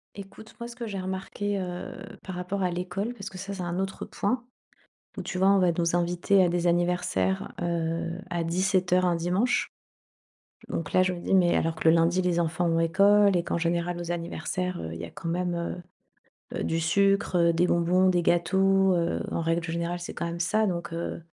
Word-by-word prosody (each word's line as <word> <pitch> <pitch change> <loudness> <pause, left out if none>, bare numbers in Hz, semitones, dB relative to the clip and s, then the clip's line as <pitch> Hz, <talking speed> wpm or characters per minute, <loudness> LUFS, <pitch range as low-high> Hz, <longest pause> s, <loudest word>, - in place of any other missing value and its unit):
Écoute, 200 +2 -11
moi 235 - -5
ce 240 - -11
que 235 -2 -5
j'ai 200 -2 -4
remarqué, 190 +2 -3
heu, 180 -1 -5 0.3
par 190 - -7
rapport 180 +2 -3
à 180 - +1
l'école 185 +6 -3
parce 200 - -7
que 185 - -10
ça 200 +1 -5
c'est 185 - -5
un 175 +1 -3
autre 190 0 -3
point, 240 +5 -2 0.7
où - - -2
tu 180 - -5
vois 190 +1 +3
on 200 0 +5
va 180 -2 +4
nous 170 0 0
inviter 175 +2 +2
à 180 - +3
des 175 0 0
anniversaires, 175 - 0
heu, 170 0 -2
à 170 -1 -1
17:00 185 +1 +1
un 175 -1 +2
dimanche, 180 +9 0 1.0
donc 165 - -4
là 185 - +4
je 185 - 0
me 175 - -6
dis: 195 - 0
«Mais 175 -2 +4
alors 165 0 0
que - - +2
le 160 - +6
lundi 170 +2 +3
les 175 -1 +1
enfants 170 +1 0
ont 165 0 +2
école 200 +3 +4
et 170 - 0
qu'en 170 - -1
général 170 +1 -1
aux 170 0 -5
anniversaires, 175 +1 -3
heu, 80 - -5
il 80 - -6
y 85 - -5
a 85 - -8
quand 165 - -7
même, 175 +1 -1
heu 170 +1 -3 0.8
heu, - - -2
du 165 0 0
sucre, 195 +3 +2
heu, 170 -1 +4
des 170 +2 +2
bonbons, 180 +2 +3
des 175 -1 +2
gâteaux», 190 +3 +3
heu, 170 -1 0
en 165 - -1
règle 165 +1 0
générale 170 +1 -3
c'est 175 - -7
quand - - -3
même 170 0 -4
ça 215 +5 +2
donc 170 -3 -3
heu, 170 0 -4
175 Hz, 215 wpm, -27 LUFS, 170-190 Hz, 1.0 s, le